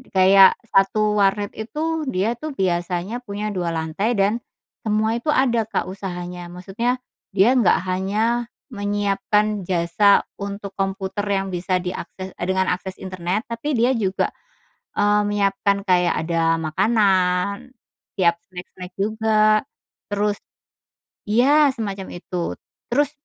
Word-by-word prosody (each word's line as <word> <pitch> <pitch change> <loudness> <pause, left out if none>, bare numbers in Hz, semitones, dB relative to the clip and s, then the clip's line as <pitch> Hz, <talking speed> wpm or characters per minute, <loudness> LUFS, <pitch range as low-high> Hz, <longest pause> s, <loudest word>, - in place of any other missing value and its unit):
kayak 190 +1 +7
1 210 0 +2
warnet 200 +1 +2
itu 310 +9 -3
dia 220 0 0
tuh 310 +3 -5
biasanya 180 +3 -1
punya 205 -1 -4
2 180 -4 -2
lantai 160 +8 -1
dan, 205 +3 +2 0.5
semua 215 +1 +1
itu 240 - -13
ada 240 -4 +2
Kak - - -2
usahanya, 180 -2 -6
maksudnya 205 +8 -2 0.4
dia 200 +5 +5
nggak 235 -8 +4
hanya 215 +6 0 0.2
menyiapkan 205 0 0
jasa 185 +3 +3 0.2
untuk 200 0 -5
komputer 195 0 -2
yang 195 0 0
bisa 180 +1 0
diakses, 185 +1 -6
e - - -7
dengan 190 0 +1
akses 185 +1 -4
internet 185 +3 -3
tapi 235 +6 -3
dia 240 +3 +3
juga, 195 -4 0 0.7
eee, 205 0 +3
menyiapkan 200 -1 +1
kayak 180 -3 +3
ada 165 -1 +2
makanan, 195 +5 +1 0.4
siap 170 -3 +2
snack-snack 180 0 -10
juga, 215 +1 +3 0.5
terus 205 0 0 0.9
ya 275 +7 +4
semacam 200 -6 -5
itu 175 -1 -3 0.4
terus, 285 +3 +2
200 Hz, 120 wpm, -22 LUFS, 185-220 Hz, 0.9 s, kayak